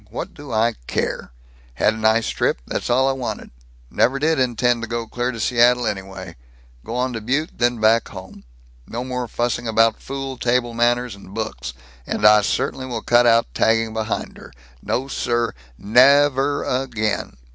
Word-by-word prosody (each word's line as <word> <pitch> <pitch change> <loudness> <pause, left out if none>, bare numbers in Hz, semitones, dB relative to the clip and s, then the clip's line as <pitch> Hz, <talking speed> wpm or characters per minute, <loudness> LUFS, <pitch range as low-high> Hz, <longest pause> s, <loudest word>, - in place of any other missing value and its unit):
What 115 - -6
do 145 -3 -11
I 115 +1 +2
care? - - -3 0.4
Had 105 - +2
nice 110 +1 +2
trip; - - 0
that's - - -4
all 130 +2 +3
I - - +3
wanted. 130 -2 -5 0.4
Never 130 +3 +2
did 155 +1 +1
intend 120 -1 +1
to 115 - -4
go 115 0 -3
clear 120 +2 -2
to 115 - -8
Seattle, 120 +1 +3
anyway. 95 -5 -5 0.5
Go 115 - -6
on 125 0 -1
to 115 - -4
Butte, 140 +8 -1
then 120 -1 +1
back 110 +2 +3
home. 95 -1 -11 0.4
No 120 +2 -4
more 125 -1 -4
fussing 120 +1 -2
about 115 0 +2
fool 135 -1 -6
table 120 -1 0
manners 120 0 +1
and 100 0 -13
books, 65 - -4 0.3
and 105 - -1
I 105 0 +7
certainly 130 +5 -2
will 115 -3 -5
cut 120 0 +4
out 115 0 +3
tagging 115 0 +1
behind 110 0 -3
her! - - -13 0.3
No, 130 +2 -2
sir! 120 -3 -1 0.2
Nev 135 - +5
er 140 +2 0
again!" 110 - -2
120 Hz, 170 wpm, -21 LUFS, 110-125 Hz, 0.5 s, I